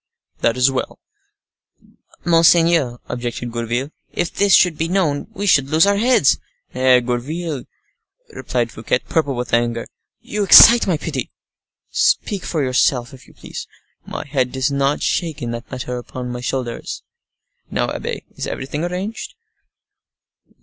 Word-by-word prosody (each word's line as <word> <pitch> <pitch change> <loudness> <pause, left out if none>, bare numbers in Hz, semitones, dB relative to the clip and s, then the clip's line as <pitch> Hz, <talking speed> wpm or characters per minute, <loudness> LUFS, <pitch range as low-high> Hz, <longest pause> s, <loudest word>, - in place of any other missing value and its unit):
"That 115 +1 +1
is 125 +2 +4
well." 130 - -4 1.3
"Monseigneur," 165 -5 +4
objected 120 0 -4
Gourville, 120 +4 -3 0.2
"if 175 - -2
this 200 0 +1
should 180 -3 +4
be 165 +2 -2
known, 170 -6 0
we 200 - -3
should 140 -8 +3
lose 160 +4 +4
our 200 0 +2
heads." 235 - +3 0.3
"Eh! 130 -1 +4
Gourville," 135 +5 -4 0.7
replied - - -2
Fouquet, - - -1
purple 150 -5 0
with 120 -3 -5
anger, 115 0 +1 0.3
"you 210 0 -3
excite 230 +4 +9
my 175 -4 +1
pity. 145 -5 -4 0.6
Speak 200 -3 +1
for 155 -4 -1
yourself, 130 0 +1
if 130 - -15
you - - -20
please. - - -8 0.4
My - - -7
head 130 -3 -1
does 130 +1 -1
not 140 +1 0
shake 160 -4 -1
in 120 -4 -4
that 120 0 -7
manner 125 -1 -5
upon 125 0 -7
my 125 0 -5
shoulders. 125 -2 -4 0.7
Now, - - -1
abbe, - - -5
is - - -4
everything 145 +4 -4
arranged?" 185 +5 -5
135 Hz, 145 wpm, -19 LUFS, 125-170 Hz, 1.3 s, excite